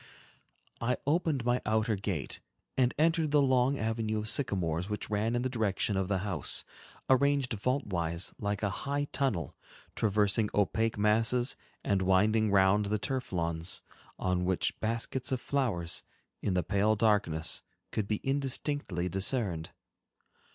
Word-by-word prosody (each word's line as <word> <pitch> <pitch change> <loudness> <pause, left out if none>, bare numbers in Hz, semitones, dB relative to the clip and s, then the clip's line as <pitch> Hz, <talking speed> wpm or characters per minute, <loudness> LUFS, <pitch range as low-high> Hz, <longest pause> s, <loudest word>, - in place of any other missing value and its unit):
I 125 +2 +1
opened 150 -4 +1
my 120 +1 +2
outer 110 +1 +1
gate 95 -8 -3 0.4
and 125 -1 +3
entered 160 0 +3
the 145 0 +4
long 130 0 +3
avenue 110 -1 -1
of 105 0 -2
sycamores 90 - 0
which 105 0 -4
ran 110 +3 +1
in 120 - 0
the - - +1
direction 110 -4 0
of 95 -1 0
the 100 -1 +1
house, 100 -3 0 0.4
arranged 140 -1 +3
vault 125 +6 0
wise 85 -2 -2
like 105 0 -2
a 105 - +1 0.2
high 145 +1 0
tunnel, 100 - -1 0.4
traversing 105 0 +2
opaque 105 +3 +1
masses, 115 +5 +2 0.3
and 100 -2 +1
winding 105 +4 +3
round 100 +1 +4
the 105 +1 +1
turf 130 +5 -3
lawns, 85 0 -1 0.3
on 90 -1 0
which 90 0 0
baskets 115 +4 -1
of 130 - +1
flowers, 120 -11 -1 0.4
in 95 - 0
the 90 - +2
pale 105 +4 +2
darkness, 100 -7 +1 0.3
could 105 -2 -1
be 105 0 -1
indistinctly 135 - -1
discerned. 95 -4 -1
110 Hz, 145 wpm, -31 LUFS, 95-125 Hz, 0.4 s, the